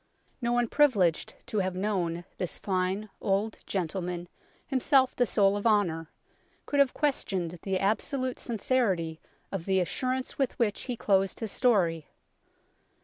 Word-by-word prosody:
No 235 0 0
one 240 0 +2
privileged 210 - +2
to 215 - -1
have 185 -1 -1
known 180 -4 -1
this 180 - -1
fine 190 +2 -1
old 205 +2 0
gentleman, 175 -1 -3 0.4
himself 265 -1 +3
the 245 - +2
soul 200 -1 +3
of 205 +2 0
honour, 170 -7 +1 0.6
could 285 - 0
have 275 -2 +4
questioned 185 - -1
the 190 -1 -1
absolute 250 +6 0
sincerity 195 -9 0 0.3
of 190 -4 -4
the 190 -1 +2
assurance 255 +10 -2
with 270 -2 0
which 215 -4 0
he 245 -3 -3
closed 195 -2 +1
his 225 -3 -3
story. 175 - +2
200 Hz, 140 wpm, -29 LUFS, 180-245 Hz, 0.6 s, have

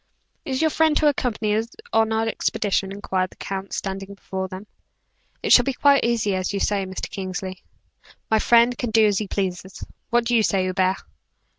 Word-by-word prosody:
"Is 260 0 -2
your 315 -1 +2
friend 315 -1 +3
to 305 - +3
accompany 225 -7 0
us 225 +1 -1 0.3
on 225 0 +3
our 220 0 0
expedition?" 200 -3 -1
inquired 190 -2 -2
the - - -18
count, 195 -1 -6
standing 195 0 -5
before 190 -1 -5
them. 185 +2 -9 0.8
"It - - +4
shall - - +9
be 275 - -1
quite 280 +1 +4
as 235 -2 +1
you 190 -2 0 0.2
say, 195 -1 0
Mr. 190 - -5
Kingsley." 185 -1 -6 0.7
"My 220 - +4
friend 235 +2 +4
can 245 - -2
do 220 0 +4
as 205 -2 +2
he 210 - -4
pleases. 190 -1 -4 0.3
What 240 0 +2
do 240 +1 +1
you 225 - +5
say, 195 -3 +1
Hubert?" 185 0 +1
205 Hz, 185 wpm, -23 LUFS, 190-235 Hz, 0.8 s, shall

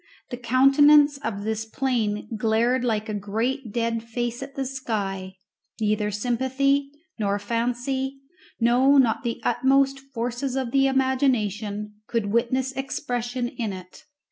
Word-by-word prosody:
The 245 - -4
countenance 275 +4 +5
of 215 -6 -4
this 220 0 -2
plain 220 -3 -1
glared 230 +3 +1
like 220 -3 0
a 215 - -3
great 225 +5 -2
dead 230 0 -1
face 240 +1 -4
at 275 0 -8
the 270 - -2
sky; 200 -8 -4 0.4
neither 210 -1 +1
sympathy, 260 +6 0 0.3
nor 200 -1 +1
fancy, 245 +5 -2 0.4
no, 250 +4 +4
not 240 -5 +3
the 235 -1 -3
utmost 275 +1 +2
forces 255 0 -4
of 260 -3 -2
the 270 +1 +4
imagination, 220 -6 0
could 225 -4 -1
witness 255 +3 +1
expression 245 -2 -3
in 225 -4 -4
it. 185 -1 -11
240 Hz, 130 wpm, -24 LUFS, 220-265 Hz, 0.4 s, countenance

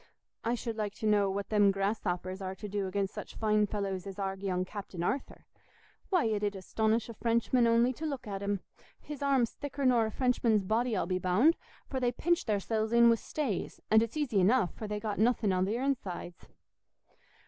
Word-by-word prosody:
I 235 +2 +1
should 230 -2 -5
like 210 -2 -3
to - - -6
know 205 -2 +3
what 200 +1 -3
them 205 -2 +4
grasshoppers 195 -2 -2
are 190 0 -4
to 210 - -7
do 200 -1 -2
against 195 +1 -2
such - - -8
fine 215 -1 +2
fellows 195 -2 -3
as 195 0 -7
our 195 -1 -2
young 185 -2 -2
Captain 190 -3 -6
Arthur. 265 +9 -3 0.6
Why, 360 - +3
it 215 -2 0
'ud 205 -1 0
astonish 220 +4 0
a 230 - -7
Frenchman 235 +2 +2
only 235 +2 +3
to 315 +5 -4
look 275 -4 -4
at 200 -2 -5
him; 200 -1 -1 0.4
his 295 -2 -8
arm's 270 -5 +2
thicker 285 -1 -4
nor 240 -3 +4
a - - -5
Frenchman's 235 -4 +2
body, 225 +3 0
I'll - - 0
be 185 +1 -1
bound, 210 - +4 0.3
for 265 - -3
they 245 -1 +1
pinch 345 +8 0
theirsells 215 +1 0
in 235 0 +7
wi' 230 - +5
stays; 230 - -3
and 220 0 +7
it's 230 +6 -2
easy 255 -9 +1
enough, 195 +1 +3
for 215 - -6
they've 210 0 -3
got 210 -2 -3
nothing 220 -3 +2
i' 185 - +1
their 220 +7 0
insides." 185 -10 -3
215 Hz, 205 wpm, -31 LUFS, 195-240 Hz, 0.6 s, in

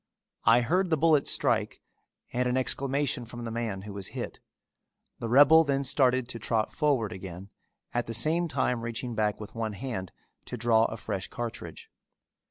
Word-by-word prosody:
I 115 +2 +6
heard 180 +9 +1
the 160 - +2
bullet 155 -2 +3
strike - - 0 0.5
and 125 0 +1
an 125 - +1
exclamation 135 0 +1
from 120 +1 -9
the 115 - -4
man 110 -5 -3
who 105 -1 -8
was 100 -1 -3
hit. - - -5 0.8
The 115 - -4
rebel 145 +6 +7
then 140 -2 0
started 130 -2 +2
to 115 - -5
trot 110 0 -1
forward 140 -9 +1
again, 95 +1 -8 0.4
at 120 0 -1
the 115 - -4
same 160 +9 +2
time 125 -6 0
reaching 115 +1 -4
back 105 -1 0
with 105 - -9
one 110 -2 -3
hand 100 -5 -5 0.3
to 125 - -6
draw 115 -1 +3
a 110 - -4
fresh 105 -3 -4
cartridge. 120 -1 -7
120 Hz, 175 wpm, -28 LUFS, 110-135 Hz, 0.8 s, rebel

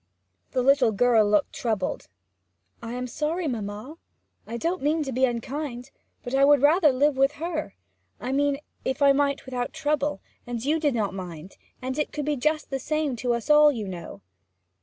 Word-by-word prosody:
The 255 - +1
little 270 -3 +4
girl 220 -1 +3
looked 205 -2 +2
troubled. 215 -6 -2 0.7
'I 230 +1 -6
am 250 0 -3
sorry, 310 +7 -2
mamma; 220 +4 -5 0.5
I 235 - -4
don't 340 +8 -1
mean 305 +3 +1
to 270 - -4
be 260 +1 +3
unkind; 250 +1 -4 0.3
but 245 - -6
I 270 +1 +4
would 285 -1 +5
rather 310 +1 +5
live 275 +2 +2
with 275 +2 +3
her; 310 - -4 0.4
I 255 - -4
mean, 285 +1 +1 0.3
if 265 +2 -1
I 280 - +7
might 280 0 0
without 250 -2 -3
trouble, 295 -5 -1 0.3
and 240 0 -4
you 310 +3 +2
did 295 -5 +1
not 205 -4 -1
mind, 180 -2 -8 0.3
and 260 +3 -3
it 300 - -1
could 295 -2 -4
be 300 0 0
just 305 +3 -1
the 270 - -1
same 305 -1 -1
to 240 +1 0
us 235 +6 -2
all, 300 0 +7
you 220 -7 -4
know.' 170 - -8
270 Hz, 185 wpm, -25 LUFS, 235-295 Hz, 0.7 s, I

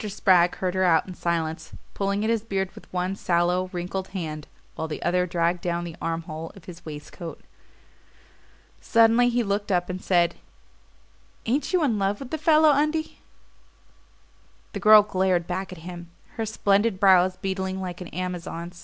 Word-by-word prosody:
Spragg 185 -3 +3
heard 185 -1 -2
her 190 0 +1
out 165 -2 +3
in 185 - -7
silence, 160 -2 -3 0.2
pulling 200 +1 -1
at 220 - 0
his 230 -2 +1
beard 195 -3 -3
with - - -15
one 185 +1 -2
sallow 180 0 +1
wrinkled 185 +1 -4
hand, 155 -5 -5 0.3
while 160 - -4
the 155 - -6
other 180 +1 +1
dragged 170 0 0
down 175 -1 -2
the 170 -2 -7
armhole 165 -1 -4
of 190 -5 -15
his 180 -1 -11
waistcoat. 155 +2 -8 1.4
Suddenly 230 +1 +4
he 240 0 +1
looked 205 0 -2
up 180 0 +1
and 185 0 -6
said: 175 -2 +2 1.1
"Ain't 265 +5 0
you 365 -3 +2
in 230 -8 +1
love 195 +1 0
with 265 -2 -9
the 315 - -2
fellow, 310 0 +5
Undie?" 305 +2 0 1.5
The - - -4
girl 215 -1 +8
glared 185 -3 +1
back 185 +2 -4
at 185 - -8
him, 175 -1 -8 0.2
her 225 -1 -4
splendid 205 -1 +1
brows 185 -1 +5
beetling 190 0 -3
like 180 -1 -6
an 180 - -6
Amazon's. 175 0 -5
185 Hz, 165 wpm, -25 LUFS, 175-205 Hz, 1.5 s, girl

